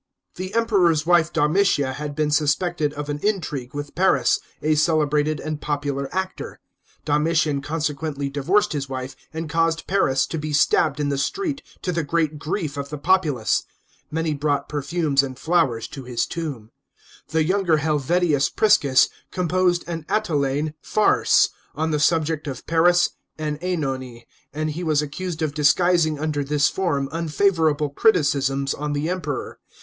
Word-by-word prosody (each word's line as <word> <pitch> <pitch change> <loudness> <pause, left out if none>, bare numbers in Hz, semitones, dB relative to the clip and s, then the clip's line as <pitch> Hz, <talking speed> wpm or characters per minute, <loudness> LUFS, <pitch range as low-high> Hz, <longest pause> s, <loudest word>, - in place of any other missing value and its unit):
The 185 +3 -6
Emperor's 185 -9 +3
wife 170 -1 +3
Domitia 150 -4 +2
had 145 +1 -5
been 150 0 0
suspected 150 +1 +1
of 145 0 -5
an 145 0 -3
intrigue 150 - -2
with 145 0 -5
Paris, 155 -9 +3 0.2
a 155 +1 +1
celebrated 150 -1 +1
and 155 -1 -5
popular 140 -2 -2
actor.* 190 0 -4 0.5
Donritian 150 -1 +1
consequently 150 -1 -3
divorced 175 +9 +1
his 140 -2 -3
wife 130 0 -5 0.2
and 160 0 -5
caused 165 0 0
Paris 135 -9 +2
to 160 - -4
be 150 0 -4
stabbed 150 0 +3
in 145 -1 0
the 140 -1 -1
street, 300 - -2 0.2
to 180 - -1
the 165 -2 -1
great 155 0 -1
grief 155 -1 -3
of 140 0 -4
the 150 - -5
populace. 150 - +1 0.5
Many 160 0 -1
brought 145 -1 -1
perfumes 150 -1 +1
and 130 -2 -6
flowers 160 -10 +1
to 135 - -8
his 125 -2 -1
tomb. 140 -10 -6 0.6
The 160 0 +1
younger 180 -1 +2
Helvidius 150 0 +1
Prisons 145 -12 +4 0.2
composed 180 0 +1
an 165 -2 -5
Atellnne 150 -6 0
farce 215 - +3 0.3
on 160 +1 -1
the 150 - 0
subject 160 0 +1
of 130 -3 -6
Paris 175 +2 +3 0.3
and 150 -1 -3
(Enone, 135 -9 -3 0.3
and 155 +1 -2
he 170 +4 -5
was 155 -3 +2
accused 165 +2 -4
of 150 -2 -1
disguising 155 +1 +3
under 150 -1 -1
this 145 +1 +2
form 150 -8 -1
unfavourable 160 -3 +1
criticisms 140 - +2
on 150 0 -3
the 145 +2 -1
Emperor. 170 -6 -4
155 Hz, 150 wpm, -23 LUFS, 145-170 Hz, 0.6 s, Prisons